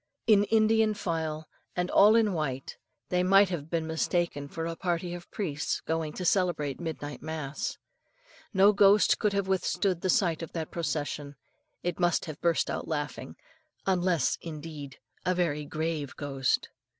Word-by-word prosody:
In 205 -2 +5
Indian 220 0 +3
file, 160 -5 -3 0.3
and 180 0 -1
all 210 +2 +7
in 220 -3 +3
white, 135 -5 -3 0.3
they 180 0 +2
might 195 +2 +5
have 160 -4 -4
been 165 -1 -1
mistaken 160 -2 -1
for 165 +3 -5
a 165 0 -3
party 175 0 -2
of 175 0 -9
priests 150 -8 -2
going 160 -1 -2
to 180 - -5
celebrate 170 -7 +1
midnight 155 -4 -5
mass. 155 -2 -4 0.7
No 200 +1 +5
ghost 200 +1 +5
could 210 -2 +1
have 200 -1 0
withstood 190 -1 0
the 185 - -1
sight 180 -8 +2
of 165 - -7
that 160 -2 -4
procession. 145 -2 -3 0.5
It 175 0 -2
must 175 -1 +2
have 155 -2 -8
burst 170 -1 +2
out - - -3
laughing, 145 -2 -4 0.5
unless, 180 -3 +1
indeed, 150 -3 -8 0.3
a 185 - +1
very 150 -4 0
grave 155 -2 -3
ghost. 135 -2 -1
170 Hz, 155 wpm, -29 LUFS, 155-190 Hz, 0.7 s, all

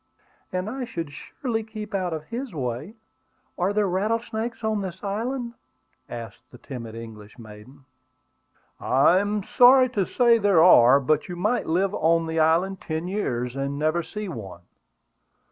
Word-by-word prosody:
"And 185 +1 -2
I 255 +4 -4
should 170 -11 -5
surely 225 - -4
keep 215 -1 -8
out 185 -3 -1
of 155 -2 -4
his 235 - -6
way. 130 - -4 0.6
Are 180 +3 0
there 205 -1 +1
rattlesnakes 225 +4 -2
on 215 -1 0
this 190 0 -7
island?" 235 +4 -3 0.6
asked 115 0 -8
the - - -14
timid 115 -5 -8
English 110 -2 -10
maiden. 115 +4 -14 0.9
"I 140 +8 +4
am 205 0 -1
sorry 255 +4 +6
to 205 -6 -1
say 235 -2 +4
there 200 -6 +4
are; 135 -6 +7
but 150 +3 0
you 175 - -5
might 215 +8 -1
live 185 +4 +1
on 165 -1 +2
the 160 0 -2
island 170 +4 +2
ten 160 +2 -4
years 125 - -2
and 140 +1 -3
never 155 +3 +1
see 210 +5 -6
one. 100 - -8
180 Hz, 155 wpm, -24 LUFS, 140-215 Hz, 0.9 s, are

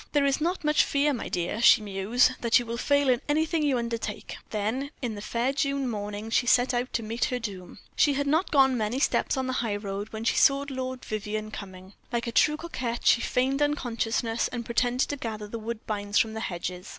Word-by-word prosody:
"There 290 -1 +3
is 275 +2 +1
not 350 +2 -1
much 300 0 +4
fear, 285 +1 +1
my 245 - -4
dear," 180 +6 -2
she - - +7
mused, 210 +5 +2
"that 235 -1 +4
you 245 - -1
will 230 0 -4
fail 285 +2 +2
in 250 -1 +3
anything 315 +2 +1
you 285 -4 +2
undertake." 230 -3 -4
Then, 225 +7 -2
in 240 -4 -3
the 205 - -7
fair 235 +5 -1
June 275 -1 0
morning, 210 -1 -5
she 245 - +2
went 250 +1 -1
out 245 +1 -1
to 230 - -1
meet 225 +2 -1
her 250 - -1
doom. 195 -6 -7 0.2
She 290 - +4
had 285 +1 -1
not 315 +6 +1
gone 270 -3 +4
many 220 +1 -1
steps 275 - +1
on 260 - -1
the 255 - -2
high 220 -4 -1
road 205 0 -5
when 220 0 -6
she 230 - +1
saw 275 0 +4
Lord 260 -1 -5
Vivianne 215 0 -4
coming. 190 -2 -9 0.2
Like 235 -1 -1
a 235 - -3
true 300 +5 +3
coquette 255 -8 -4
she 235 - +5
feigned 265 +4 0
unconsciousness, 235 -5 0
and 240 -2 -5
pretended 245 +2 +1
to 285 - -3
gather 215 -4 -5
the 230 +2 -6
woodbines 215 -2 -3
from 220 -1 +2
the 220 - -4
hedges. 180 -1 -5
235 Hz, 220 wpm, -27 LUFS, 215-275 Hz, 0.2 s, she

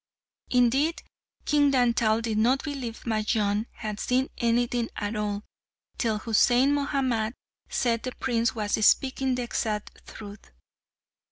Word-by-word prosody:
Indeed 265 +6 +2 0.4
King 290 -1 +3
Dantal 235 -3 +2
did 220 -2 -1
not 255 +5 +2
believe 265 -6 -5
Majnun 215 -1 0
had 215 -2 -6
seen 255 +2 0
anything 235 0 +1
at 205 +1 -3
all, 210 -1 -2 0.6
till 225 -3 +1
Husain 245 +4 +3
Mahamat 260 -5 0 0.3
said 230 -3 0
the 255 - -4
prince 235 -2 0
was 215 0 -1
speaking 260 +3 +3
the 250 - -2
exact 215 -3 -4
truth. 205 -1 -11
235 Hz, 120 wpm, -26 LUFS, 215-255 Hz, 0.6 s, King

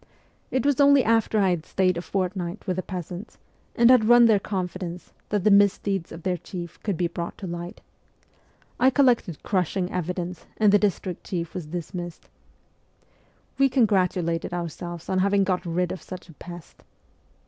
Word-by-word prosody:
It 260 -1 -1
was 285 -1 +3
only 280 -2 +6
after 225 -1 +2
I 190 -2 +3
had 170 -3 -1
stayed 185 0 +1
a 170 - -3
fortnight 185 0 -3
with 185 -2 -2
the - - 0
peasants, 180 +2 -7 0.4
and 235 +1 +6
had 235 -4 +5
won 240 0 +7
their 220 -3 +5
con 190 -2 -2
fidence, 180 0 -7 0.2
that 205 -3 0
the 210 - +4
misdeeds 200 -2 +3
of 165 0 -9
their 180 -1 0
chief 175 -1 -8
could 200 -5 -2
be 175 - +1
brought 170 0 -4
to 195 - -7
light. 175 +2 -6 1.0
I 260 - +6
collected 245 - +2
crushing 185 -1 -1
evidence, 180 0 -4
and 210 -2 +4
the 205 - +5
district 190 -3 -1
chief 170 -3 -4
was 180 -5 -5
dismissed. 175 +1 -6 1.3
We 275 0 +5
congratulated 180 -8 +1
our 170 -1 -2
selves 175 +1 -8
on 185 - 0
having 200 +1 +3
got 185 -1 0
rid 175 +1 0
of 185 - -6
such 185 -1 -10
a - - -12
pest. 175 +2 -11
185 Hz, 175 wpm, -25 LUFS, 175-205 Hz, 1.3 s, won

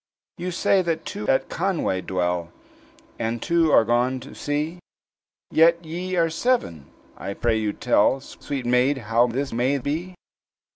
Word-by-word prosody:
"You 180 +1 -3
say 185 +2 +2
that 165 -2 -2
two 105 - -5
at 130 - +2
Conway 170 - -1
dwell, 90 -2 -2 0.7
And 115 +1 -1
two 165 +3 +2
are 110 - +6
gone 125 +3 +1
to 135 - -11
sea, 150 +4 -3 0.7
Yet 170 +1 +4
ye 180 +3 -4
are 165 -2 +2
seven? 160 - 0 0.3
I 100 +1 -5
pray 115 -2 +1
you 105 -1 0
tell, 105 +6 +2
Sweet 135 -1 -6
maid, 125 +3 +3 0.2
how 120 +2 +5
this 135 +3 -3
may 125 +4 +1
be?" 160 +7 -4
135 Hz, 150 wpm, -24 LUFS, 115-170 Hz, 0.7 s, are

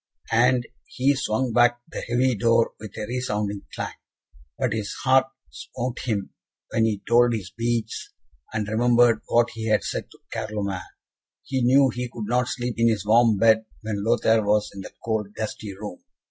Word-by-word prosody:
And 120 +1 +3 0.2
he 135 +2 +2
swung 130 -2 -1
back 120 0 +4
the - - -4
heavy 125 +2 +1
door 115 +2 +2
with 110 -2 -10
a 105 - -3
resounding 105 -4 -2
clang. - - -4 0.6
But 130 -5 0
his 105 -2 -3
heart 130 0 +4 0.2
smote 120 - -5
him 105 -5 -2 0.4
when 110 - +2
he 105 -3 -1
told 120 +1 +5
his 95 -5 -4
beads, 115 0 -2 0.4
and 110 -2 -2
remembered 120 +1 +4
what 120 0 +3
he 110 -1 -5
had 110 -1 +2
said - - -4
to - - -18 0.2
Carloman. 100 -3 -3 0.6
He 130 -1 -2
knew 135 +2 +5
he 125 0 -4
could 110 - -5
not 120 +2 +1
sleep 120 -2 -3
in 115 - +4
his 105 -3 -1
warm 115 0 +5
bed 110 +1 +4 0.2
when 105 -2 -3
Lothaire 115 0 +3
was 105 0 +1
in 100 - -7
that - - -11
cold 105 -2 -2
gusty 105 -2 -5
room. 105 -3 -8
115 Hz, 175 wpm, -24 LUFS, 105-120 Hz, 0.6 s, told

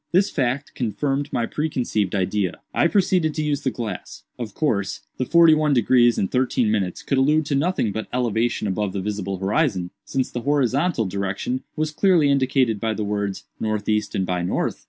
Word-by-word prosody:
This 190 +3 +3
fact 135 0 -1
confirmed 135 +4 -2
my 115 - 0
preconceived 120 -10 -1
idea. 95 -1 0 0.2
I - - +3
proceeded 180 -5 +2
to 155 - -1
use 150 -1 -1
the 135 - 0
glass. 110 -5 -6 0.2
Of 110 -5 -6
course, 100 -11 -1 0.2
the 130 - 0
'forty 170 +2 +6
one 155 -2 +2
degrees 120 0 +4
and 95 - -1
thirteen 125 -3 +1
minutes' 95 -5 -1
could 135 - +1
allude 150 +3 +3
to 145 - -2
nothing 145 - +1
but 110 +2 -4
elevation 120 -2 0
above 100 0 -1
the 100 - -2
visible 100 -1 -3
horizon, 95 - 0
since 130 +3 -2
the 120 - -4
horizontal 140 0 +1
direction 100 +6 -2
was 155 0 -1
clearly 165 -3 +3
indicated 130 -5 +2
by 110 0 -1
the 110 - -2
words, 100 -1 -2 0.2
'northeast 105 0 -1
and 95 - 0
by 90 -1 -1
north. 90 - -1
120 Hz, 180 wpm, -23 LUFS, 105-145 Hz, 0.2 s, forty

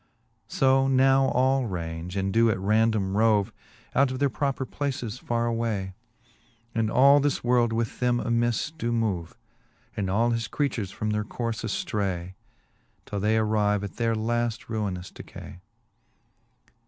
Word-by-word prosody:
So 135 0 +3
now 135 0 +4
all 130 0 +2
range, 85 -1 -5
and 95 0 -1
doe 115 +1 +4
at 110 - +1
random 105 0 +1
rove 105 -2 +3 0.4
Out 140 0 +3
of 130 - -4
their 140 0 +1
proper 135 +4 -1
places 130 -5 -4
farre 120 0 -1
away. 115 -5 -2 0.8
And 115 -1 0
all 140 +5 +6
this 145 0 0
world 120 -1 +3
with 115 -1 -2
them 125 -1 +2
amifs 120 +5 0
doe 120 -7 -3
move, 100 -8 -2 0.6
And 95 -2 -2
all 115 +5 +2
his 115 -1 -1
creatures 125 -9 -2
from 105 +2 -3
their 105 0 0
courfe 115 +1 -4
aftray, 100 - -2 0.7
Till 100 - -4
they 105 +3 +2
arrive 105 -2 +1
at 100 - -7
their 115 -1 +1
lafl 115 +1 -1
ruinous 100 -5 -3
decay. 90 - -11
115 Hz, 145 wpm, -26 LUFS, 105-125 Hz, 0.8 s, all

